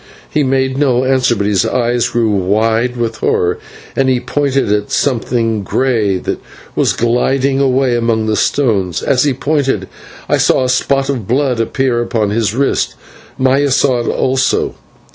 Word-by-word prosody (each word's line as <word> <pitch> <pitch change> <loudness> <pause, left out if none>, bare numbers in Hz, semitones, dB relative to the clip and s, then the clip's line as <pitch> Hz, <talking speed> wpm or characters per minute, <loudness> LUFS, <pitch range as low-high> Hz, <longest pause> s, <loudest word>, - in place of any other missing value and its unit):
He 150 - +1
made 130 0 0
no 130 -3 +2
answer, 130 -2 +2
but 100 -2 -2
his 100 -2 +2
eyes 120 -1 0
grew 115 -2 0
wide 110 +5 0
with 115 -1 -2
horror, 90 -4 0 0.4
and 135 -1 +2
he 130 -1 +2
pointed 135 -2 -1
at 105 0 -1
something 115 -4 0
grey 105 -2 0
that - - -4 0.4
was - - +2
gliding 135 +3 +1
away 130 -2 +2
among 115 -2 0
the 110 0 0
stones, 100 - 0
and - - 0
as 130 +1 +3
he 140 - +2
pointed 135 -8 -1 0.4
I - - +2
saw - - +2
a 130 - -1
spot 135 +1 +1
of 120 -8 -3
blood 130 -1 0
appear 120 +1 0
upon 110 -3 -1
his 110 -1 0
wrist. 140 +1 0 0.4
Maya 135 +2 +2
saw 130 -1 +2
it 120 - -3
also. 130 0 0
125 Hz, 165 wpm, -14 LUFS, 110-135 Hz, 0.4 s, as